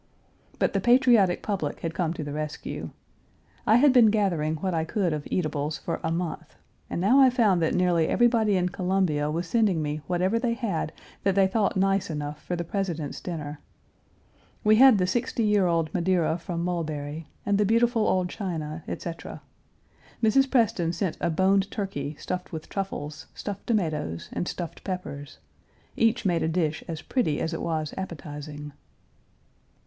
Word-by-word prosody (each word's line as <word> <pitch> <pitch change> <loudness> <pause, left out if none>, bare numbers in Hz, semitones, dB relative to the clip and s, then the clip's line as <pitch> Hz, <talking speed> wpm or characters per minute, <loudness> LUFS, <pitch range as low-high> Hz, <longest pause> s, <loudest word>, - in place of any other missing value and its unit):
But - - +1
the - - +1
patriotic 240 -7 +4
public 185 -9 -2
had 165 -1 -3
come 170 -2 0
to 155 - -4
the 145 -1 -5
rescue. 150 0 -5 0.8
I 220 - +6
had 265 +2 +6
been 245 -4 +7
gathering 180 -8 +1
what 185 +4 -2
I 160 -1 +1
could 180 -1 0
of 150 -1 -4
eatables 150 -3 -1
for 165 - -4
a 160 - 0
month, 170 0 -4 0.3
and - - -3
now 215 +10 +5
I 265 -1 +8
found 220 -8 +3
that 160 - +1
nearly 175 -3 +3
everybody 230 -4 +3
in 180 0 +1
Columbia 180 -5 0
was 165 +3 -2
sending 205 -3 +2
me 150 0 -2
whatever 185 +5 +1
they 235 -1 0
had 200 -11 -2 0.3
that 195 -1 +1
they 195 -1 +5
thought 200 +1 +1
nice 195 -1 +2
enough 150 -1 -4
for 175 - -2
the 170 - -3
President's 170 -5 -3
dinner. 150 -4 -5 1.0
We 215 0 +5
had 260 -2 +8
the 180 - +2
sixty 230 +4 -1
year 210 -3 +3
old 165 -2 0
Madeira 175 -2 +1
from 170 0 -4
Mulberry, 155 -3 -3 0.2
and 205 0 +2
the - - +5
beautiful 230 0 +3
old 185 -1 +2
china, 165 -6 -5
etc. 165 -1 -6 0.8
Mrs. 270 +5 +4
Preston 200 -10 +2
sent 170 -1 -2
a - - +1
boned 190 +4 +2
turkey 155 -9 -4
stuffed 180 0 -5
with 160 -2 -7
truffles, 190 -7 -5
stuffed 205 -1 -6
tomatoes, 155 - -1
and 175 - -2
stuffed 175 -2 -6
peppers. 155 -6 -6 0.6
Each 225 0 +2
made 175 -3 +2
a - - +1
dish 160 -2 -1
as 160 -1 -5
pretty 195 - 0
as 160 - -2
it 165 - -3
was 155 -2 -2
appetizing. 150 -4 -7
180 Hz, 170 wpm, -26 LUFS, 155-205 Hz, 1.0 s, I